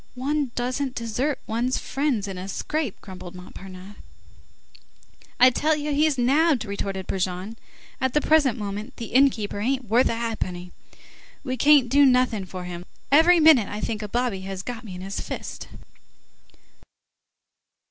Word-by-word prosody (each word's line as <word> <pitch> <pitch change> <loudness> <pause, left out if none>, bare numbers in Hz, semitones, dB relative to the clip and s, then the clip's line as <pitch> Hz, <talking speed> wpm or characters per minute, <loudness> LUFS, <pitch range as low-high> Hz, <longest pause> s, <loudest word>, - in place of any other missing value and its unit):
"One 280 +2 -1
doesn't 255 +2 -2
desert 245 +5 -1
one's 240 +3 -1
friends 270 -7 -1
in 190 -2 -6
a 185 - -6
scrape," 280 +4 -3
grumbled 185 -2 -10
Montparnasse. 185 +2 -11 1.4
"I 255 +1 +8
tell 310 +5 +1
you 300 0 -3
he's 300 -1 +2
nabbed!" 275 +1 +3
retorted 195 -2 -4
Brujon. 185 +3 -3 0.5
"At 260 0 0
the - - +5
present 290 -7 +3
moment, 210 +4 -5
the 230 -2 -7
inn 275 +2 +6
keeper 210 -4 -5
ain't 255 +4 -1
worth 240 +4 +4
a - - -1
ha'penny. 185 -6 -4 0.7
We 255 -2 -2
can't 285 0 +5
do 280 +4 +4
nothing 250 -6 +3
for 185 0 -7
him. 175 -1 -6
Let's 180 - -15
be 280 - -1
off. - - +9
Every 345 +2 +5
minute 305 -9 +6
I 205 - -5
think 220 0 -3
a 210 - -4
bobby 240 -3 -1
has 190 0 -6
got 245 +1 -6
me 195 -5 -8
in 180 - -8
his 195 +1 -5
fist." - - -7
235 Hz, 165 wpm, -24 LUFS, 195-275 Hz, 1.4 s, off